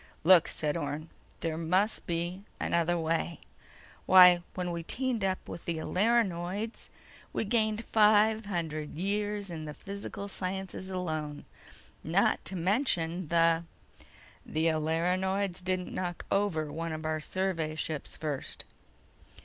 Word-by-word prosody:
"Look," 180 0 +7
said 150 -1 -1
Orne. 155 -1 -4 0.3
"There 160 -1 -2
must 185 +6 +1
be 175 +2 -2 0.2
another 170 +1 +1
way. 165 0 -1 0.7
Why... 180 -2 +9
when 180 -1 -2
we 170 0 -3
teamed 240 +4 -1
up 190 -1 -1
with - - -8
the 170 -1 -2
Alerinoids 200 +2 0 0.4
we - - 0
gained 215 0 +1
five 215 0 +4
hundred 155 -6 -3
years 205 +2 -1
in 160 -2 -5
the 150 -1 -7
physical 200 0 -6
sciences 190 0 -4
alone, 155 -5 -3 0.6
not - - +2
to 190 - -1
mention 180 - +1
the—" 165 0 +3 0.8
"The 160 +1 0
Alerinoids 180 +4 0
didn't 185 0 -2
knock 175 -2 -3
over 170 -7 +1
one 165 +2 -3
of 155 0 -5
our 155 0 0
survey 165 -2 -2
ships 155 -2 -4
first." 150 -4 -4
175 Hz, 125 wpm, -30 LUFS, 160-195 Hz, 0.8 s, Why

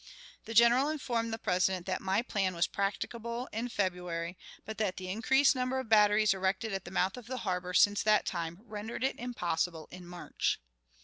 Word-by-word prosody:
The 225 - -6
General 240 +5 +6
informed 240 -7 -2
the 225 - -2
President 185 -2 0
that 185 -1 -2
my 195 +4 +1
plan 195 -6 -1
was 170 +1 +2
practicable 235 +4 -3
in 230 +3 -2
February, 180 -4 -2 0.3
but 220 0 -7
that 200 -4 0
the 185 -1 -6
increased 265 +7 +4
number 255 +1 -1
of 260 -4 -4
batteries 210 -1 +5
erected 190 +3 -1
at 195 -1 -3
the - - -7
mouth 190 +3 0
of 240 -2 -10
the 255 +1 -4
harbor 180 -1 -2
since 205 0 +5
that 215 0 +3
time 170 +1 -4
rendered 215 +2 -6
it 265 - -1
impossible 175 -8 -2
in 180 0 -10
March. 175 0 -2
205 Hz, 185 wpm, -31 LUFS, 180-235 Hz, 0.3 s, General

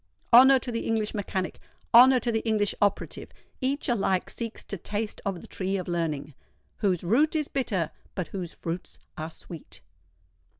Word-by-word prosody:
Honour 265 +3 +9
to 250 -1 -4
the 230 - -3
English 220 -2 0
mechanic—honour 230 +6 +3
to 240 - 0
the 225 - +1
English 215 -3 +1
operative: 205 -1 0 0.3
each 275 +3 -1
alike 195 -6 +1
seeks 230 -1 -6
to - - -6
taste 210 +4 -4
of 190 -3 -3
the - - -12
tree 195 +1 -2
of 185 - -5
learning, 160 -4 -2 0.4
"whose 185 -4 0
root 270 - +3
is 305 -2 0
bitter, 195 - -1 0.2
but 185 - -3
whose 180 -4 -5
fruits 170 +2 -6 0.2
are 155 +1 -5
sweet!" 160 - -11
205 Hz, 160 wpm, -27 LUFS, 180-235 Hz, 0.4 s, Honour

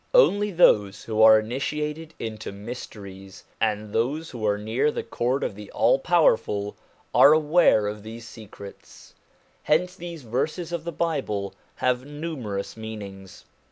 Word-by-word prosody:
Only 210 - +5
those 105 - +3
who 110 -1 -1
are 110 0 +8
initi 130 +7 -3
ated 155 +2 -6
into 110 -2 -6
mysteries, 100 -3 -9 0.2
and 105 -1 -1
those 145 +8 -1
who 120 -4 -7
are 105 0 +2
near 115 +8 0
the - - -3
Court 125 +3 -1
of - - -2
the 105 0 -11
All - - +3
Powerful, 110 - +2 0.4
are 145 - +8
aware 155 -8 +4
of 105 0 -4
these 115 +2 -9
secrets. 100 -3 -13 0.5
Hence 180 +4 +1
these 170 -4 -8
verses 155 +9 -2
of 170 -2 -4
the 170 - -3
Bible 135 -12 -2 0.2
have 125 0 0
numerous 145 -9 -5
meanings. 100 -4 -9
115 Hz, 145 wpm, -25 LUFS, 105-155 Hz, 0.5 s, are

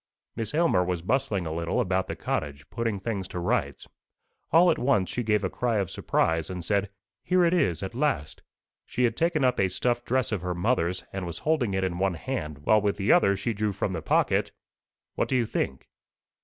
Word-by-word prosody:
"Miss 115 +3 -3
Aylmer 160 - +3
was 90 -2 -2
bustling 105 -5 0
a 80 - -3
little 85 0 -1
about 95 0 0
the - - -4
cottage, 70 0 -3
putting 115 -4 -2
things 100 -3 -3
to 90 - -5
rights. 90 - -1 0.6
All 170 +3 +6
at - - -1
once 125 -8 +2
she 125 - -2
gave 105 -2 +1
a - - +2
cry 120 -3 0
of 100 -3 -1
surprise, 80 -1 0
and 90 -2 -5
said, 100 0 +1 0.3
'Here 180 -1 +3
it 170 - +2
is, 90 - +1
at 95 - -5
last!' 125 - -1 0.5
She 125 - -1
had 115 -2 +2
taken 165 -3 +1
up 125 -1 +2
a 95 - +4
stuff 120 +5 -1
dress 130 -1 0
of 105 -5 -1
her 90 0 -3
mother's, 90 -2 0
and 95 -2 -4
was 85 -1 -5
holding 135 -11 +1
it 95 - 0
in 90 -2 -2
one 95 -2 +1
hand, 80 - -4
while 110 -1 +5
with 100 -1 0
the 100 0 +2
other 100 0 +4
she 115 +4 -2
drew 105 0 -1
from 95 0 -2
the 80 - -3
pocket - - +1 0.6
what - - -1
do 130 - +1
you 120 -2 +2
think?" 65 -10 -3
100 Hz, 215 wpm, -27 LUFS, 90-125 Hz, 0.6 s, All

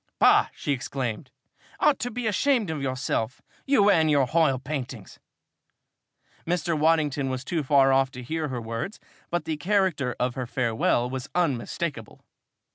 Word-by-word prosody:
"Bah!" - - +5
she - - -3
exclaimed. 130 -2 -3 0.5
"Ought 300 -2 +3
to 245 - -2
be 245 0 -5
ashamed 220 - +1
of 155 -3 -4
yourself! 130 -3 -2 0.3
You 210 -7 +5
and 160 -4 +3
your 145 -3 +4
h'oil 155 -1 +2
paintings!" 130 -5 -6 1.2
Mr. 170 -1 -1
Waddington 150 -3 +2
was 130 0 -4
too 170 -3 -1
far 135 -1 +4
off 135 0 +3
to 125 -1 -8
hear 155 +4 -2
her 130 -3 -4
words 115 - -5 0.3
but 175 -2 -2
the 160 -1 -2
character 175 -8 0
of 125 0 0
her 125 -1 -4
farewell 120 0 +1
was 130 0 -5
unmistakable! 145 -5 -2
140 Hz, 150 wpm, -26 LUFS, 130-170 Hz, 1.2 s, Bah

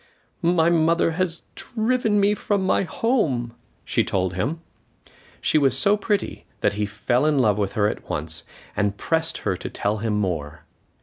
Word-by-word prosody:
"My 170 -1 +3
mother 165 0 +3
has 170 0 -2
driven 225 -2 0
me 200 +1 +4
from 205 -2 -1
my - - +2
home," 165 - 0 0.3
she - - +1
told 95 -1 -1
him. 130 - -2 0.8
She 155 - +3
was 135 -3 +4
so 200 +8 +4
pretty 205 -1 -2 0.2
that 100 - +2
he 105 0 -1
fell 115 +5 0
in 150 -2 +2
love 105 -5 +3
with 100 -2 -1
her 105 -1 +2
at - - -5
once, 80 +2 -3 0.3
and 100 -1 0
pressed 160 +5 0
her 100 -3 +1
to - - -6
tell 105 +2 -1
him 110 0 -1
more. 80 -7 -2
135 Hz, 170 wpm, -23 LUFS, -, 0.8 s, me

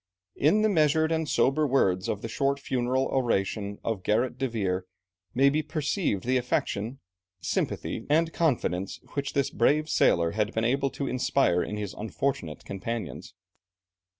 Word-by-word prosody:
In 185 +10 +3
the - - +5
measured 160 -3 +3
and 160 -2 0
sober 150 +3 +2
words 95 -9 +2
of 105 - -3
the - - -2
short 135 +5 0
funeral 130 0 0
oration 100 -5 -1
of 110 -4 -2
Gerrit 115 +6 +1
de 135 - +1
Veer 95 -6 -2 0.5
may 135 +2 +5
be 150 +3 +3
perceived 150 - -1
the 130 +2 +2
affection, 125 0 -1 0.4
sympathy, - - -2
and 160 +2 +2
confidence 115 - 0
which 140 0 -2
this 140 -1 +1
brave 150 +6 +2
sailor 85 - +3
had 105 +2 -1
been 110 0 +1
able 135 +3 +1
to 140 - -4
inspire 130 -9 +2
in 105 - -3
his 105 -2 -4
unfortunate 105 - -3
companions. 100 - -5
125 Hz, 150 wpm, -27 LUFS, 105-140 Hz, 0.5 s, the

